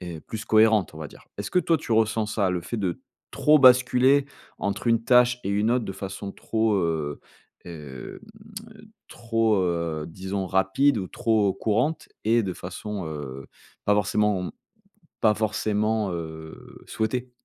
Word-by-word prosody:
heu, 80 - -10
plus 110 0 -7
cohérente 110 -5 +4
on - - -9
va 80 -1 -6
dire. - - -17
Est-ce 100 -1 -5
que 180 - +4
toi 165 -1 +2
tu 145 - -7
ressens 110 0 +2
ça? 105 -3 0
Le 90 -1 -2
fait 120 - -5
de 95 -5 -2 0.3
trop 150 +1 +4
basculer 130 +1 +5 0.3
entre 100 +2 -3
une 115 -1 +2
tâche 125 0 +4
et - - -3
une 105 +3 +1
autre 125 -1 +1
de - - -4
façon 95 +1 -6
trop, 110 0 0
heu, 80 -5 -1 0.5
hem, 75 -7 -9 0.9
trop, 115 -2 0
heu, 85 -3 -2
disons 95 +3 -4
rapide 95 +9 +2
ou 95 - -4
trop 110 -4 +1
courante, 125 +9 -1 0.2
et 115 +2 +4
de 95 -2 -3
façon, 95 +2 -6
heu, 70 -3 -7 0.4
pas 105 - +4
forcément, 105 -1 +1
mmh, 90 - -5 0.7
pas 105 -1 +4
forcément, 110 0 0
heu, 80 -1 -8
souhaitée? 125 +3 -2
105 Hz, 160 wpm, -25 LUFS, 90-115 Hz, 0.9 s, basculer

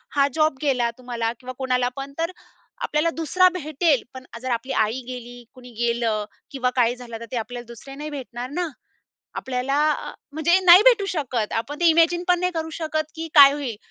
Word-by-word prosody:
हा 280 -1 +4
जॉब 310 -3 +2
गेला, 255 -5 +1
तुम्हाला 240 -2 -3
किंवा 255 0 -8
कुणाला 255 -1 +1
पण 275 0 -6
तर 330 +2 -1 0.5
आपल्याला 305 -4 +1
दुसरा 365 +3 +4
भेटेल, 310 -4 +1
पण 260 0 -10 0.2
जर 260 0 -3
आपली 240 +3 -2
आई 230 +5 -4
गेली, 245 -1 -8
कुणी 250 -1 -13
गेलं 230 -3 0 0.3
किंवा 255 -2 0
काही 245 -1 +2
झालं, 240 -2 -9
तर 230 - -8
ते 255 - -2
आपल्याला 240 +2 -5
दुसरे 240 +3 -11
नाही 300 +2 -6
भेटणार 255 -3 -6
ना. 355 +2 -1 0.7
आपल्याला 265 +3 -1
अ, - - -4 0.2
म्हणजे 320 +5 +3
नाही 355 +2 +10
भेटू 470 -5 +5
शकत. 250 -8 -2
आपण 275 +6 -3
ते - - +3
इमॅजिन 335 +2 +3
पण 355 -1 +3
नाही 360 0 0
करू 320 0 -2
शकत, 310 -1 -2
की 325 0 -5
काय 280 -2 +10
होईल? 280 -6 -4
270 Hz, 190 wpm, -23 LUFS, 245-315 Hz, 0.7 s, नाही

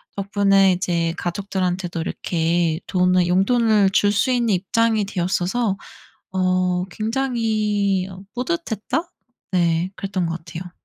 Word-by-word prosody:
덕분에 195 -1 +3
이제 170 -2 0
가족들한테도 180 -1 -2
이렇게 165 -1 0
돈을 180 -1 +2
용돈을 205 +2 +3
줄 205 +1 +3
수 210 +5 +1
있는 240 -2 +1
입장이 215 +3 +1
되었어서 190 +3 -1 0.6
어 185 -1 +1
굉장히 215 -4 0
어 185 -1 -10
'뿌듯했다?' 260 - -2 0.5
네 170 0 +1
그랬던 190 -3 -2
것 165 0 -3
같아요. 170 +2 -8
190 Hz, 260 characters per minute, -21 LUFS, 180-215 Hz, 0.6 s, 덕분에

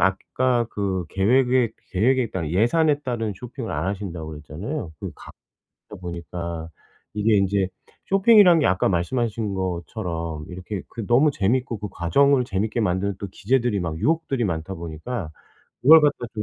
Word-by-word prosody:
아까 120 +6 +1
그 95 -3 -2
계획에 125 +3 +3 0.2
계획에 120 +4 +2
따른 85 -5 -3
예산에 145 - +2
따른 120 -5 -2
쇼핑을 125 0 -7
안 75 +5 -2
하신다고 95 -5 -4
그랬잖아요, 80 - -6
그 - - -5
가다 - - -16 0.5
보니까. 85 -1 -6 0.4
이게 105 +1 +2
인제 100 -1 +2 0.4
쇼핑이란 195 -3 +6
게 145 - +3
아까 95 0 +2
말씀하신 105 +3 -1
것처럼 85 -3 -4
이렇게 90 +2 -6
그 115 -3 -7
너무 135 +6 +5
재밌고 115 0 0
그 105 - -5
과정을 130 +10 +3
재밌게 105 +3 -2
만드는 100 -1 0
또 100 - -4
기제들이 120 -1 0
막 80 -2 -3
유혹들이 135 -1 0
많다 85 +1 -3
보니까 85 +4 -5 0.5
그걸 160 +5 +9
갖다 145 -1 +3 0.2
좀 105 - -2
105 Hz, 335 characters per minute, -23 LUFS, 90-125 Hz, 0.5 s, 그걸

